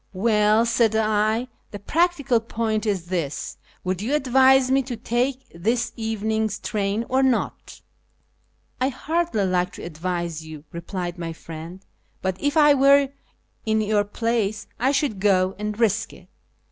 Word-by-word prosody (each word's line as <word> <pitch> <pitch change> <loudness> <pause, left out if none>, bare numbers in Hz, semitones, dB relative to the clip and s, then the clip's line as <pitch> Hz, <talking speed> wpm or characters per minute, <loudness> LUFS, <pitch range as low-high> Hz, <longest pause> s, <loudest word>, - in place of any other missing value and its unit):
" - - -40 0.2
Well," 210 +2 +4
said 230 -1 +2
I, 215 +2 +1
" - - -42
the 205 - -7
practical 290 - +1
point 225 -1 -2
is 190 -5 -1
this, 170 -5 -3 0.3
would 185 0 -2
you 255 +8 0
advise 265 -1 +4
me 270 +1 +4
to 250 -2 -6
take 250 +4 -1
this 230 +7 -1
evening's 220 -1 -1
train 210 +1 -2
or 260 +1 +2
not? 260 -3 -1 0.3
" - - -43
" - - -39
I 260 - +3
hardly 315 - -1
like 180 -1 0
to - - -9
advise 170 0 -4
you," 155 -2 -10
replied 175 +1 -5
my 165 -1 -4
friend, 165 +4 -10 0.2
" - - -41
but 190 -1 0
if 290 +2 0
I 295 -1 +7
were 275 0 +5 0.5
in 220 0 +1
your 210 -1 +2
place 215 0 -1
I 260 +3 +2
should 275 -8 0
go 190 -2 +3
and 210 +1 -4
risk 225 -1 +1
it." - - -17
220 Hz, 165 wpm, -23 LUFS, 190-255 Hz, 0.5 s, I